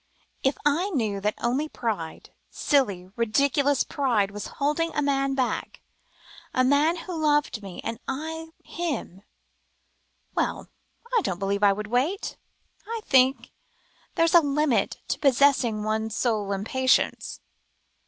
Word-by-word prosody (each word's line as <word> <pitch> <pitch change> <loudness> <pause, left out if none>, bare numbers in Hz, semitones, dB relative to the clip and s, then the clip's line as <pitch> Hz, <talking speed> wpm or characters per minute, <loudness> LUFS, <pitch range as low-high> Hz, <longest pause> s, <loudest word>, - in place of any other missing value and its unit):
"If 270 0 +1
I 325 +7 +2
knew 220 - -1
that 210 +1 0
only 265 +6 -1
pride, 205 - -4 0.2
silly, 200 -10 0
ridiculous 275 +4 +2
pride, 230 -8 0
was 205 0 -6
holding 300 +4 0
a - - +1
man 275 -1 +1
back, 260 -2 -2 0.8
a 255 - +4
man 285 +5 +3
who 345 +1 -6
loved 295 -7 +1
me 195 -3 -8
and 230 - -4
I 320 +4 -4
him 310 - -4 1.1
well, - - -2 0.5
I 460 - +5
don't 180 - -2
believe 200 +2 -1
I 200 -1 +5
would 210 +2 -5
wait. 260 - -1 0.5
I 455 0 -4
think 260 0 +3 0.6
there's 330 0 +3
a 345 - +8
limit 290 -3 +1
to - - -1
possessing 260 -5 +3
one's 220 0 -1
soul 215 -5 0
in 195 0 -2
patience." 260 +4 +1
265 Hz, 135 wpm, -26 LUFS, 215-295 Hz, 1.1 s, a